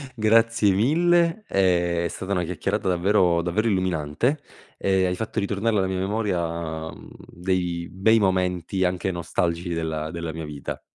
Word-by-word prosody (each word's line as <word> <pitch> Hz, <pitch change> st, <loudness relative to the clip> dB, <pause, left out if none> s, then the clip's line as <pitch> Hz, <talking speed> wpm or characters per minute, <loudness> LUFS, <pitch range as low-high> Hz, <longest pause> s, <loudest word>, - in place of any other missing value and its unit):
Grazie 115 Hz, -1 st, +3 dB
mille, 170 Hz, -, +2 dB
è 85 Hz, -2 st, +2 dB
stata 95 Hz, +1 st, -6 dB
una 90 Hz, -2 st, +1 dB
chiacchierata 95 Hz, +4 st, -2 dB
davvero 90 Hz, -1 st, +3 dB
davvero 105 Hz, +6 st, 0 dB
illuminante, 95 Hz, -, 0 dB, 0.4 s
e 95 Hz, -1 st, +2 dB
hai 90 Hz, 0 st, 0 dB
fatto 110 Hz, +1 st, -3 dB
ritornare 105 Hz, +2 st, 0 dB
alla 95 Hz, -1 st, +1 dB
mia 95 Hz, 0 st, -2 dB
memoria, 85 Hz, -6 st, -2 dB
ehm, 80 Hz, -, -12 dB, 0.2 s
dei 90 Hz, -1 st, -2 dB
bei 110 Hz, +5 st, +3 dB
momenti, 95 Hz, -1 st, 0 dB
anche 90 Hz, +1 st, -1 dB
nostalgici 85 Hz, 0 st, -2 dB
della 80 Hz, -1 st, -3 dB
della 85 Hz, -1 st, -5 dB
mia 80 Hz, -1 st, -5 dB
vita. 75 Hz, -2 st, -6 dB
95 Hz, 145 wpm, -24 LUFS, 85-105 Hz, 0.4 s, Grazie